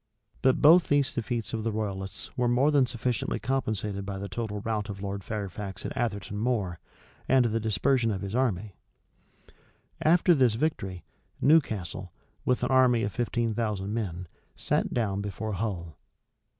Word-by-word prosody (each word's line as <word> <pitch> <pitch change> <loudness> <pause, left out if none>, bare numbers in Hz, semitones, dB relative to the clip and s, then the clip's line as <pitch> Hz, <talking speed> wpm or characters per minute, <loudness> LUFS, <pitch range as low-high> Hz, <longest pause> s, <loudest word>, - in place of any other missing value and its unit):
But 130 -1 +3
both 165 +4 +8
these 145 -2 +2
defeats 120 -1 -3
of 110 -1 -2
the 115 - 0
royalists 100 -3 -4
were 125 -1 +1
more 125 +5 +3
than 140 -4 +4
sufficiently 120 -1 -1
compensated 110 -5 -2
by 100 0 -5
the 100 +1 -5
total 105 +2 -4
rout 105 -1 -2
of 100 -1 -6
Lord 100 0 -4
Fairfax 100 -2 -5
at 145 - -4
Atherton 105 -5 -2
Moor, 105 -7 -1 0.5
and 130 -2 +5
the 115 0 +1
dispersion 115 +3 +2
of 100 -3 -2
his 100 0 -5
army. 110 -6 0 1.3
After 175 +2 +5
this 130 -7 +3
victory, 100 - -2 0.4
Newcastle, 100 - +2 0.3
with 125 - +1
an - - 0
army 125 -3 +5
of 100 - -1
fifteen 120 -2 0
thousand 105 -3 -2
men, 90 -6 -3 0.3
sat - - 0
down 100 -5 0
before 105 +2 -4
Hull. 90 -6 -4
110 Hz, 155 wpm, -28 LUFS, 100-125 Hz, 1.3 s, both